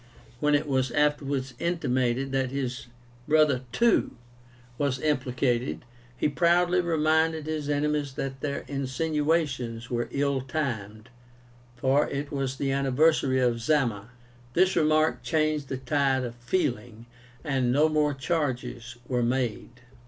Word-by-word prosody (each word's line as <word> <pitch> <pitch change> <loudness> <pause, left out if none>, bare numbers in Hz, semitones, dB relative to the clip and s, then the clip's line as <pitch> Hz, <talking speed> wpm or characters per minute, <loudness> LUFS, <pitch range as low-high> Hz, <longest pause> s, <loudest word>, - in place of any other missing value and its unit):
When 150 +2 +3
it 145 - +1
was 130 -2 +1
afterwards 140 -2 0
intimated 135 -6 0
that 135 -1 0
his 130 -2 -4 0.4
brother 150 -4 +4
too 235 - +2 0.6
was 140 -3 0
implicated, 130 -4 -1 0.3
he - - +1
proudly 175 +4 +3
reminded 160 -1 +1
his 155 -2 -3
enemies 145 -1 0
that 135 0 -5
their 140 -1 -3
insinuations 140 -3 -1
were 120 -1 -1
ill 140 0 0
timed, 120 -6 -4 0.7
for 135 +4 +2
it 140 +1 -4
was 135 -2 -2
the 135 0 -1
anniversary 135 0 +2
of 120 -2 +1
Zama. 115 -6 0 0.5
This 185 +2 +3
remark 155 -1 +2
changed 155 -3 0
the 130 - -2
tide 135 0 +1
of 120 -1 -4
feeling, 120 -4 -2 0.4
and 135 -5 0
no 150 +4 +4
more 150 -2 +1
charges 130 -5 -3
were 125 -2 0
made. 120 0 -2
140 Hz, 125 wpm, -27 LUFS, 125-150 Hz, 0.7 s, brother